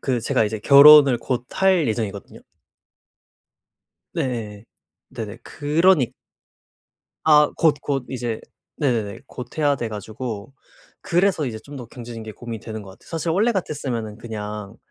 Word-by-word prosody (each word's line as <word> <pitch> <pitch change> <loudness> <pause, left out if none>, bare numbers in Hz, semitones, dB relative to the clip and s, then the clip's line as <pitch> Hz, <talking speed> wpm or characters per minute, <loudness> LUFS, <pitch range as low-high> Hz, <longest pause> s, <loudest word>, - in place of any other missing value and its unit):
그 125 -3 -1
제가 110 - +1
이제 110 +1 -3
결혼을 140 +1 +8
곧 125 +1 -3
할 190 -5 +3
예정이거든요. 105 -3 -4 1.7
네. 110 -4 -4 0.4
네네. 110 0 -7
그러니 155 -1 +2 1.1
아 150 -1 +6
곧, 160 -2 +4
곧 135 -3 -2
이제 120 -3 -4 0.4
네네네. 115 -9 -1
곧 125 -1 -9
해야 145 -2 +3
돼 120 - -3
가지고 110 +2 -6 0.5
그래서 175 -2 +1
이제 110 -3 -5
좀 140 +5 -11
더 125 - -7
경제적인 120 -1 -9
게 110 - -8
고민이 115 -1 -7
되는 110 -2 -7
것 95 - -11
같아요. 95 - -18
사실 165 0 -2
원래 210 +8 +2
같았으면은 130 - -3
그냥 105 -2 -7
120 Hz, 280 characters per minute, -22 LUFS, 110-150 Hz, 1.7 s, 결혼을